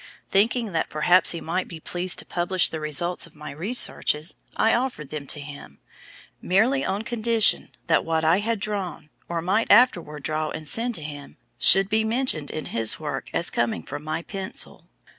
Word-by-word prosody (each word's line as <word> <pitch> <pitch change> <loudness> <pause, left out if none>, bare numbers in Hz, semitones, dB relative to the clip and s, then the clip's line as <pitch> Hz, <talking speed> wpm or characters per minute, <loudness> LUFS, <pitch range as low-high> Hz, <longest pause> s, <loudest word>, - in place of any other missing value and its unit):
"Thinking 220 +2 +2
that 165 -2 -1
perhaps 175 +4 +3
he 170 - 0
might 180 +3 -2
be 165 - -9
pleased 180 +3 0
to - - -3
publish 175 +1 +1
the 160 - -5
results 155 +4 0
of - - -22
my 150 -1 -9
researches, 160 - +1 0.2
I 225 - +3
offered 235 - -2
them 150 -2 -6
to 150 - -1
him, 145 - -10 0.6
merely 245 +9 +2
on 200 +3 -2
condition 230 -1 +1 0.2
that 160 - +2
what 160 -1 -1
I 165 +4 +4
had 225 +1 -1
drawn, 195 -7 -5 0.2
or 170 -1 -3
might 205 +6 0
afterward 175 - +3
draw 155 +1 -2
and 155 -1 -7
send 230 +8 +2
to 160 - -6
him, 145 -2 -9 0.2
should 195 0 +7
be 220 +2 +1
mentioned 220 - -1
in 155 - -5
his 115 -1 +3
work - - -5
as - - 0
coming 115 -8 -1
from 145 - -7
my 155 +2 -4
pencil. 195 +1 -5
175 Hz, 180 wpm, -24 LUFS, 155-215 Hz, 0.6 s, should